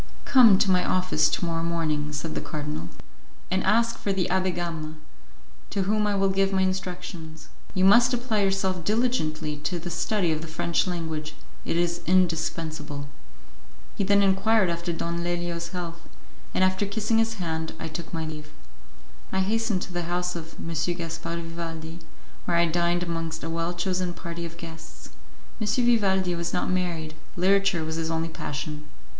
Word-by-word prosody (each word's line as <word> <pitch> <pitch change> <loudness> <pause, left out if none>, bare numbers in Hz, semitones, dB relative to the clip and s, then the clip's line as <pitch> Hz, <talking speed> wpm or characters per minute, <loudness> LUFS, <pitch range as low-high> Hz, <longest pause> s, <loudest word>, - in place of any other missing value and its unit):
"Come 235 -7 +8
to 195 - +3
my 180 -1 +4
office 185 -4 +2
to 175 - 0
morrow 165 -1 -1
morning," 155 -3 0
said 150 +2 -3
the - - -2
cardinal, 150 - -4 0.6
"and 190 0 +2
ask 230 +3 +3
for 200 - -1
the 190 -2 +1
Abbé 185 -1 +2
Gama, 165 -3 -3 0.7
to 195 - 0
whom 210 +2 +2
I 205 - +1
will 195 0 +3
give 195 0 +2
my 190 -1 +3
instructions. 180 -4 -4 0.3
You 185 0 +4
must 235 +5 +7
apply 240 -4 +1
yourself 190 -2 +1
diligently 160 -9 0
to 160 +5 -2
the 175 +1 -5
study 175 +1 +1
of 155 -1 -1
the 165 - -6
French 165 +3 0
language; 160 -3 -3 0.3
it - - 0
is 175 0 +1
indispensable." 160 -5 0 0.9
He - - 0
then 200 +1 +4
enquired 195 0 +4
after 170 +1 -2
Don 170 +1 -2
Leilo's 175 -1 -2
health, 170 -1 -6 0.5
and - - +4
after 190 +2 +2
kissing 220 +2 +1
his 225 0 +1
hand 160 -4 -3
I - - -4
took 165 +1 -6
my 160 -1 -2
leave. 150 -1 -7 0.8
I 190 - +1
hastened 220 0 +1
to 180 - -8
the 175 -1 -2
house 180 0 -1
of 165 -1 -7
M. 165 - -5 0.2
Gaspar 165 -1 -4
Vivaldi, 165 -1 -5 0.5
where 170 - +2
I 170 - +5
dined 170 +1 +1
amongst 165 -1 -3
a 165 - -3
well 165 +1 -1
chosen 180 0 -1
party 170 -1 -5
of 165 0 -13
guests. 165 - -10 0.5
M. 215 - 0
Vivaldi 205 -6 +3
was 170 0 -3
not 180 - 0
married; 170 -4 -1 0.2
literature 195 -1 +3
was 160 0 -3
his 165 0 -1
only 165 0 -1
passion. 150 -1 -5
175 Hz, 170 wpm, -26 LUFS, 165-190 Hz, 0.9 s, Come